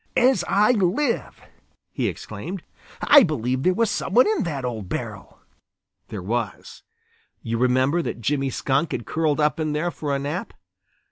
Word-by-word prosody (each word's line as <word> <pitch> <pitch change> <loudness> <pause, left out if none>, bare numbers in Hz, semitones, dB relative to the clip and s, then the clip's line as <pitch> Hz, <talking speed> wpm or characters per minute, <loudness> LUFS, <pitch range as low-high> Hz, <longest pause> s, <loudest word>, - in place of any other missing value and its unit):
"As 250 -7 +4
I 210 +4 +4
live," 230 +5 0 0.5
he - - -1
exclaimed, 160 - -6 0.4
"I 290 0 +8
believe 130 - 0
there 185 +5 +2
was 230 -1 +1
some 190 - -3
one 250 - +7
in 435 - +1
that 140 -6 -3
old 110 -6 -4
barrel!" - - -6 0.7
There 100 -4 -6
was. 110 -1 -4 0.6
You 115 0 -2
remember 130 +6 +2
that 155 - -4
Jimmy 135 +4 0
Skunk 140 +4 0
had 120 - -4
curled 155 -2 0
up 150 +1 +2
in 155 -1 -1
there 160 +4 -1
for 145 -4 -3
a - - +1
nap. 145 +7 -4
150 Hz, 160 wpm, -23 LUFS, 125-185 Hz, 0.7 s, I